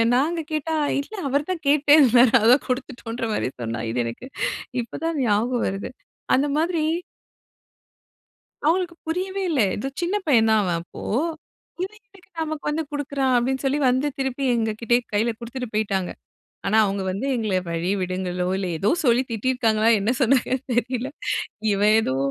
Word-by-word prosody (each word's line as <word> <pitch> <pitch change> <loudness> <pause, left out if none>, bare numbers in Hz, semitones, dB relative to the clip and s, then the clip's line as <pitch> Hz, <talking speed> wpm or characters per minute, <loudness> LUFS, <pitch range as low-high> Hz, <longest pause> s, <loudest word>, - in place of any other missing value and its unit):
நாங்க 320 +6 +1
கேட்டா 310 +1 -1 0.3
இல்ல 355 +10 -10
அவர் 285 +2 0
தான் 330 -4 -4
கேட்டுட்டே 290 +1 +5
இருந்தாரு. 245 -2 +6
அதான் 245 +5 +5
குடுத்துட்டோன்ற 245 -2 -4
மாதிரி - - 0
சொன்னான். 115 0 -3
இது 120 - -4
எனக்கு 115 - -6 0.5
இப்போ 235 - -9
தான் 330 -2 -1
ஞாபகம் 235 +3 +1
வருது. 195 +1 -4 0.5
அந்த 275 +3 +2
மாதிரி 330 0 +1 1.8
அவுங்களுக்கு 340 +2 +1
புரியவே 375 +4 -2
இல்ல. 290 -6 +1 0.2
ஏதோ 265 +6 -3
சின்ன 365 +4 0
பையன் 230 -7 +4
தான் 220 -1 +4
அவன் 175 -3 0
அப்போ. 175 - -11 0.8
"இத 380 - -2 0.2
எதுக்கு 390 -5 -21
நமக்கு 310 -1 -4
வந்து 315 +2 -1
குடுக்கிறான்?" 275 -3 0
அப்டி 255 +3 +1
சொல்லி 270 +2 +1
வந்து 260 +4 +2
திருப்பி 265 0 -2
எங்க 225 -1 0
கிட்டயே 240 +1 +3
கையில 225 +3 +1
குடுத்துட்டு 245 +1 -6
போய்ட்டாங்க. 195 -4 0 0.6
ஆனா, 215 - +3
அவுங்க 200 -1 -1
வந்து 200 +8 -3
எங்கள 215 -5 0
வழி 170 +3 -1
விடுங்களோ, 180 0 -2
இல்ல 195 -1 -2
ஏதோ 200 - +1 0.2
சொல்லி 240 +1 +4
திட்டிருக்காங்களோ 225 -1 +1
என்ன 205 +4 +1
சொன்னாங்கன்னு 260 +1 +2
தெரியல. 250 +2 -1 0.6
இவன் 205 +2 +4
ஏதோ 130 -10 -1
250 Hz, 155 wpm, -23 LUFS, 215-290 Hz, 1.8 s, இருந்தாரு